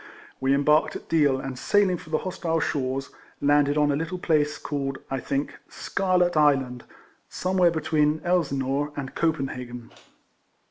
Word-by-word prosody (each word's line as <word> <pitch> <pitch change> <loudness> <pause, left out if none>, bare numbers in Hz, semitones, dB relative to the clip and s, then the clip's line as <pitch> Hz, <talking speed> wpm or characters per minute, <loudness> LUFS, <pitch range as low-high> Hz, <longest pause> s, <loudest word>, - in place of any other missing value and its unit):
We 135 +1 +2
embarked 150 +2 +3
at - - -9
Deal, 145 -5 +3
and 130 -1 -6
sailing 200 -3 +2
for 155 - -13
the 155 - +1
hos 185 +2 -6
tile 165 -1 0
shores, 135 -2 -2 0.3
landed 145 0 +3
on 150 -1 +3
a - - +1
little 165 +5 -3
place 150 -4 +1
called, 135 -2 -3
I 135 - -1
think, 140 +2 -3
Scarlet 180 -2 0
Island, 135 -5 +2 0.4
somewhere 185 -1 +2
between 155 -1 +1
Elsineur 145 -4 0
and 135 -2 -5
Copenhagen. 125 -7 -3
145 Hz, 145 wpm, -25 LUFS, 135-165 Hz, 0.4 s, embarked